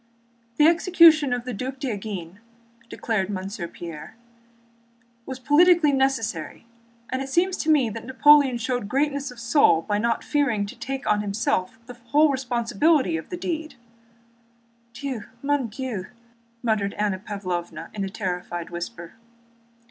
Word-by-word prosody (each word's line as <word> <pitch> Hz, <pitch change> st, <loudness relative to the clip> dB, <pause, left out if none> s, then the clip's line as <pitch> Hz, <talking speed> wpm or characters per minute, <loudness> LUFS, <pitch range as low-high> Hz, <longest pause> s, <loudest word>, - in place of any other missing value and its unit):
"The 300 Hz, -, +5 dB
execution 330 Hz, -4 st, +5 dB
of 245 Hz, -1 st, -2 dB
the 250 Hz, -, -4 dB
Duc 260 Hz, +5 st, -5 dB
d'Enghien," 205 Hz, -, -5 dB, 0.5 s
declared 210 Hz, -5 st, -2 dB
Monsieur 190 Hz, -2 st, -4 dB
Pierre, 170 Hz, +5 st, -9 dB, 1.1 s
"was 260 Hz, -, -5 dB
a -, -, -21 dB
political 325 Hz, +1 st, +5 dB
necessity, 230 Hz, -, -1 dB, 0.5 s
and 260 Hz, +1 st, -1 dB
it 270 Hz, -, -5 dB
seems 360 Hz, +6 st, +2 dB
to 320 Hz, -, -2 dB
me 290 Hz, -6 st, +4 dB
that 225 Hz, +2 st, -8 dB
Napoleon 280 Hz, -1 st, +5 dB
showed 235 Hz, -2 st, -3 dB
greatness 280 Hz, +2 st, 0 dB
of 250 Hz, -1 st, -12 dB
soul 235 Hz, -, +3 dB
by 205 Hz, 0 st, -1 dB
not 230 Hz, +1 st, 0 dB
fearing 270 Hz, -9 st, 0 dB
to 200 Hz, -, -9 dB
take 270 Hz, +3 st, -5 dB
on 210 Hz, -, +2 dB
himself 200 Hz, -1 st, -1 dB
the 245 Hz, -, -9 dB
whole 285 Hz, +6 st, +2 dB
responsibility 255 Hz, -, +1 dB
of 160 Hz, -, -6 dB
that 355 Hz, 0 st, -6 dB
deed." 320 Hz, -3 st, -4 dB, 1.2 s
"Dieu! 260 Hz, -4 st, -5 dB, 0.2 s
Mon 285 Hz, -3 st, +1 dB
Dieu!" 225 Hz, -4 st, -5 dB, 0.6 s
muttered 215 Hz, -4 st, 0 dB
Anna 205 Hz, -3 st, -1 dB
Pávlovna 185 Hz, -4 st, -5 dB
in 200 Hz, -, -3 dB
a 195 Hz, -, -3 dB
terrified 180 Hz, -4 st, -4 dB
whisper. 175 Hz, 0 st, -7 dB
240 Hz, 140 wpm, -24 LUFS, 200-280 Hz, 1.2 s, The